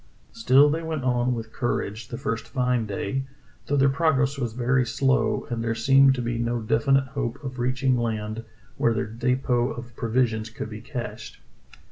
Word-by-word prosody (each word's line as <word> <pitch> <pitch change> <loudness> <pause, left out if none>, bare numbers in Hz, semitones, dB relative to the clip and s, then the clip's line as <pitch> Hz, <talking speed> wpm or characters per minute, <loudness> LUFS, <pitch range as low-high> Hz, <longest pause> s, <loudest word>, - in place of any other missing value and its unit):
Still 130 +5 +5
they 160 +2 -1
went 160 -4 -3
on 125 0 +1
with 115 -1 -7
courage 110 -2 -2
the 120 - -6
first 115 0 -3
fine 125 -1 0
day, 105 +6 -3 0.4
though 145 - +1
their 135 0 +5
progress 140 -1 +2
was 120 -5 -3
very 125 +2 +2
slow, 135 +3 +1
and 115 -1 -2
there 115 0 -1
seemed 135 +3 +5
to 125 - -3
be 120 0 -2
no 120 0 0
definite 135 +5 +2
hope 135 -4 -3
of 130 -2 -6
reaching 130 +1 +1
land 110 -2 -2 0.3
where 115 -1 +2
their - - 0
depot 120 +2 0
of 120 -2 -8
provisions 115 -2 0
could 110 0 -7
be 105 0 -7
cached. 120 -4 -7
120 Hz, 175 wpm, -25 LUFS, 115-135 Hz, 0.4 s, Still